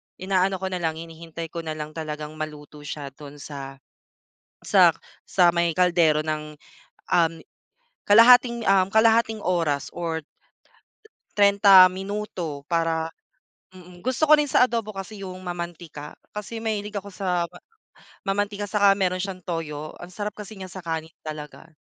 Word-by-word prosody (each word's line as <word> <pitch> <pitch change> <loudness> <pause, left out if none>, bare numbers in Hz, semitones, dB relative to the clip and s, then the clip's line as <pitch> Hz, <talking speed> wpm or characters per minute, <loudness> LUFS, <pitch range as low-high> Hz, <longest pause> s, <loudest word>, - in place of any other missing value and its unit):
inaano 190 0 +1
ko 190 0 -4
na 180 - -2
lang, 160 -2 -1
hinihintay 165 0 -8
ko 170 - -5
na 160 -1 -4
lang 155 0 -6
talagang 155 -1 -6
maluto 150 -1 -7
siya 140 -2 -6
dun 145 +1 -12
sa 140 -2 -8 0.9
sa - - +5 0.3
sa 175 -2 +4
may 170 -1 +1
kaldero 170 -4 +3
ng, 155 -1 -4 0.6
um, 165 -1 +3 0.7
kalahating, 235 +2 +6
um, 195 -1 +4
kalahating 225 0 +3
oras 165 -6 0
or 165 -2 -2 1.2
30 200 -2 +7
minuto 190 -6 -5
para 165 -1 0 0.6
mm. 180 -1 -14
Gusto 280 +4 +1
ko 305 - +9
rin 295 - +2
sa 260 - +3
adobo 230 -4 0
kasi 195 0 -7
yung 185 0 -8
mamantika. 170 -4 -7 0.2
Kasi 225 +2 -6
mahilig 210 -1 -3
ako 200 0 -5
sa 180 -3 -1 0.7
mamantika 205 +1 -2
saka 200 -2 +5
meron 185 -2 0
siyang 185 -1 -5
toyo, 155 -3 -4
ang 175 - -9
sarap 210 0 -3
kasi 210 +1 -8
niya 190 -2 -9
sa 190 - -9
kanin 160 0 -3 0.2
talaga. 155 +1 -8
180 Hz, 145 wpm, -24 LUFS, 160-200 Hz, 1.2 s, ko